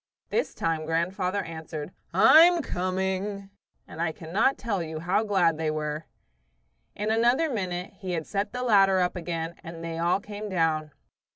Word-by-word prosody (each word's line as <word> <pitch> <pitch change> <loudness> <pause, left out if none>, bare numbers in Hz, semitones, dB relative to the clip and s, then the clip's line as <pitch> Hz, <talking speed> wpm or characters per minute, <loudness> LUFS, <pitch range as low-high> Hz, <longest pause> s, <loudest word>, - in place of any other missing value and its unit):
This 470 - -1
time 160 -1 -1
grandfather 185 +4 0
answered, 160 -1 -7 0.2
"I'm 335 +1 +7
coming!" 190 +2 -2 0.4
and 160 - -7
I 170 -1 +1
cannot 175 +12 0
tell 205 -6 -2
you 160 -1 -5
how 180 +5 +1
glad 180 -7 +2
they 160 -1 0
were. 155 0 -3 0.9
In 210 +2 -1
another 240 +8 +3
minute 185 -5 -3
he 185 -3 -4
had 160 -2 -2
set 200 0 -2
the 250 +1 -4
ladder 195 -5 +5
up 180 0 +1
again 165 -1 -3
and 165 0 -8
they 165 0 -4
all 175 +3 +2
came 210 +1 -7
down. 160 -4 0
180 Hz, 160 wpm, -27 LUFS, 165-205 Hz, 0.9 s, I'm